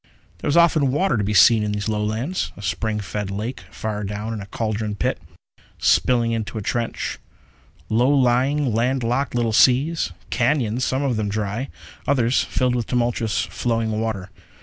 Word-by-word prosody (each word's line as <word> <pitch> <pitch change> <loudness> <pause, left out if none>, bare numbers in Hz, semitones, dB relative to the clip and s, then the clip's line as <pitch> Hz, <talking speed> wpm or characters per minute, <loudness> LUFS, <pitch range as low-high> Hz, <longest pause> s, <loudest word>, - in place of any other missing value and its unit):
There - - -4
was 150 - +2
often 160 -5 +4
water 145 +2 +1
to 105 - 0
be 105 +2 -1
seen 110 +5 +7
in 105 0 -1
these 105 +1 -3
Lowlands. 110 +10 -2
A 100 - -10
spring 105 +4 -1
fed 100 +1 -4
lake 105 +6 -4
far 105 -1 -4
down 105 +3 -4
in 110 - -5
a 100 - -9
caldron 110 0 -2
pit, - - -1 0.6
spilling 120 -2 +3
into 115 0 -3
a - - -3
trench; 115 +2 -2 0.7
low 120 +4 +2
lying, 135 0 +2
land 125 +3 +1
locked 125 +2 -1
little 115 -2 +1
seas; 135 - +3 0.2
cañons, 125 -2 +1
some 130 +2 0
of 130 -5 0
them 105 -1 -1
dry, 105 +5 -3 0.4
others 125 -3 +2
filled 125 -1 0
with 120 -3 -2
tumultuous 120 -2 0
flowing 115 -2 -1
water. 100 -4 -3
115 Hz, 170 wpm, -22 LUFS, 105-130 Hz, 0.7 s, seen